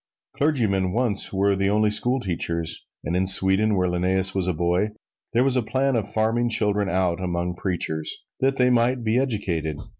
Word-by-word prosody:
Clergymen 105 -11 0
once 115 -4 0
were 100 +1 +1
the 95 0 0
only 105 +1 +2
schoolteachers, 90 -8 0 0.2
and 85 - -3
in 95 +1 0
Sweden, 95 +3 +4
when 90 -1 0
Linnæus 95 +1 +1
was 95 -2 -1
a - - +2
boy, 90 +6 0 0.4
there 120 +2 +3
was 135 -1 +2
a 125 - +2
plan 130 +4 -1
of 105 -3 -2
farming 115 +2 0
children 105 -3 +1
out 90 0 0
among 90 -1 -2
preachers 80 -4 -2
that 135 +1 +1
they 125 0 +3
might 120 +1 +1
be 115 +2 +1
educated. 90 - -2
100 Hz, 175 wpm, -23 LUFS, 90-115 Hz, 0.4 s, Sweden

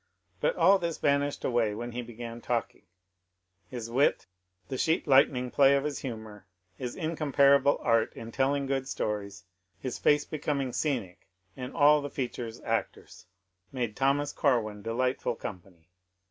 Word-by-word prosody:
But - - +1
all 195 0 +5
this 170 -2 -2
vanished 145 0 0
away 115 -4 +1
when 120 +2 -5
he 120 +1 -4
began 120 0 -8
talking; 115 -5 -3 0.8
his 120 -3 -6
wit, 135 +4 +2 0.4
the 135 - -4
sheet 160 +1 +1
lightning 130 -2 +4
play 140 0 +5
of 140 - +1
his 150 -2 -3
humour, 110 -6 -8 0.3
his 125 +4 -5
incomparable 140 -4 +3
art 115 -2 +2
in 115 0 -9
telling 140 +2 +1
good 135 -1 -1
stories 100 -6 -4 0.2
— 95 +1 -46
his 130 -2 -5
face 145 0 +3
becoming 140 -4 -2
scenic, 120 - -3 0.3
and 125 -1 -7
all 150 +1 +5
the 145 - -5
features 120 -4 -5
actors - - -4 0.2
— 90 0 -46
made 120 -5 -3
Thomas 140 +2 +1
Corwin 110 -7 0
delightful 125 +2 -1
company. 90 -5 -10
125 Hz, 150 wpm, -29 LUFS, 115-140 Hz, 0.8 s, all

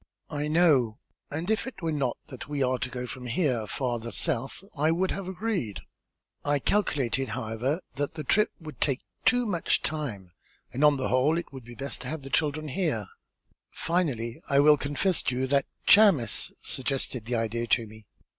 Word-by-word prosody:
"I 150 0 -2
know, 150 -9 +4 0.3
and 165 +7 -2
if 220 +4 0
it 195 -8 -8
were 165 - 0
not 140 -5 -1
that 130 +1 -9
we 145 -2 0
are 130 0 +1
to 130 - -2
go 125 0 -4
from 125 0 -7
here 120 -5 0
farther 120 -2 -2
south, 135 +3 -1
I 150 +1 +2
would 180 +3 +1
have 195 -2 -4
agreed. 190 - -2 0.6
I 145 0 +2
calculated, 135 - +1
however, 125 - -2 0.2
that 145 0 -2
the 155 - -4
trip 210 +10 +3
would 155 -6 -10
take 135 -2 +2 0.2
too 245 -1 +4
much 180 -6 +1
time 115 - -3 0.4
and 135 - 0
on 150 -1 +6
the 130 - -1
whole 135 +6 +3
it 170 - -5
would 130 -3 -9
be 120 0 -11
best 140 +2 -5
to 125 - -6
have 155 +1 -4
the 135 - -8
children 155 +1 0
here. 130 - -1 0.6
Finally, 135 -10 -1
I 140 - +4
will 150 +1 +7
confess 145 +6 +1
to 125 - -1
you 130 +1 0
that 140 +1 +2 0.2
Chamis 195 - +5
suggested 130 -3 -1
the 120 +1 -1
idea 115 +1 -1
to 115 0 +3
me. 110 -1 -14
140 Hz, 185 wpm, -28 LUFS, 125-160 Hz, 0.6 s, will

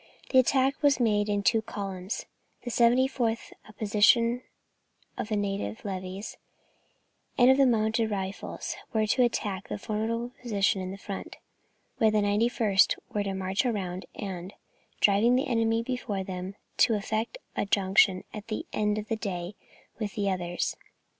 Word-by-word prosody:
The 260 - +7
attack 270 +3 +2
was 285 -2 +4
made 210 -3 +2
in 205 -1 0
two 225 +2 +3
columns; 195 -2 -5 0.4
the 245 - -4
74th, 240 -1 +2 0.2
a - - -13
portion 225 +3 +3 0.7
of - - -4
the 215 - 0
native 195 - -3
levies, 190 +1 -5 1.0
and 250 +1 +7
of 265 - +4
the 275 -1 +5
Mounted 220 -1 +2
Rifles, 195 -1 -4 0.2
were 220 -1 +2
to 235 +4 +2
attack 205 -5 0
a - - -3
formidable 225 +3 -2
position 205 -4 +1
in 185 +1 -5
front, 195 0 -7 0.6
while 220 - +5
the 215 - +1
91st 210 0 +3 0.2
were 210 - +1
to 195 -1 -2
march 190 +1 0
round, 190 -7 -2
and, 190 -2 -6 0.5
driving 215 +5 +5
the 260 - +2
enemy 230 -2 +1
before 230 -6 -3
them, 185 +1 -6 0.2
to 230 - +4
effect 220 - -2 0.2
a - - -1
junction 195 -1 +3
at 210 0 -7
the 215 - -3
end 210 0 +1
of 215 0 -4
the 225 - 0
day 185 -4 -4 0.5
with 210 -3 -3
the 200 -2 0
others. 175 -1 -2
210 Hz, 155 wpm, -28 LUFS, 195-230 Hz, 1.0 s, The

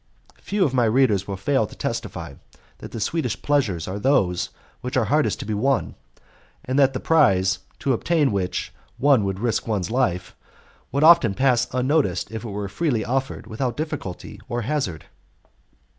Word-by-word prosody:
Few 200 -2 +1
of 130 - -1
my 125 -2 +3
readers 110 -5 +2
will 100 -1 -4
fail 110 +2 +1
to - - -13
testify - - -4 0.5
that - - -8
the 115 - -6
sweetest 160 +10 -2
pleasures 120 - +1
are 95 +2 -4
those 95 -8 +2 0.3
which 125 +1 -3
are 125 - +3
hardest 150 +8 +1
to - - -6
be 110 - -2
won, 135 +6 0 0.7
and 130 +2 0
that 135 -1 +4
the 130 - -3
prize, 95 -13 +3 0.2
to 135 - 0
obtain 150 +2 +1
which 95 -3 -2 0.2
one 135 -5 +4
would 95 -1 -2
risk 115 +1 -1
one's 105 -3 -1
life, 90 -8 0 0.6
would 140 +3 +1
often 155 - +6
pass 125 -1 +2
unnoticed 130 +3 0
if 110 0 -5
it 115 - -5
were 100 0 -4
freely 120 - -1
offered 135 +2 -2
without 120 +2 -3
difficulty 155 - -5
or 120 0 -2
hazard. 110 - -2
120 Hz, 170 wpm, -23 LUFS, 100-140 Hz, 0.7 s, often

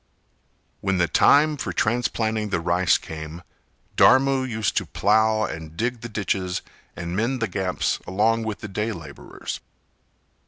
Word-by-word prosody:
When 95 -1 0
the 85 -1 +2
time 150 - +4
for 130 - -3
transplanting 110 -2 0
the 95 - 0
rice 85 +1 +2
came, 80 +2 -8 0.5
Dharmu 130 0 +4
used 110 -2 -1
to - - 0
plough 110 +1 +2
and 80 -4 -6
dig 120 0 -1
the 120 - -6
ditches 95 -3 -2 0.3
and 85 0 -5
mend 120 +5 0
the 115 - 0
gaps 95 -1 -1
along 110 +5 +2
with 110 -2 -4
the - - -5
day 105 +3 -2
labourers. 80 -6 -8
105 Hz, 145 wpm, -24 LUFS, 90-115 Hz, 0.5 s, time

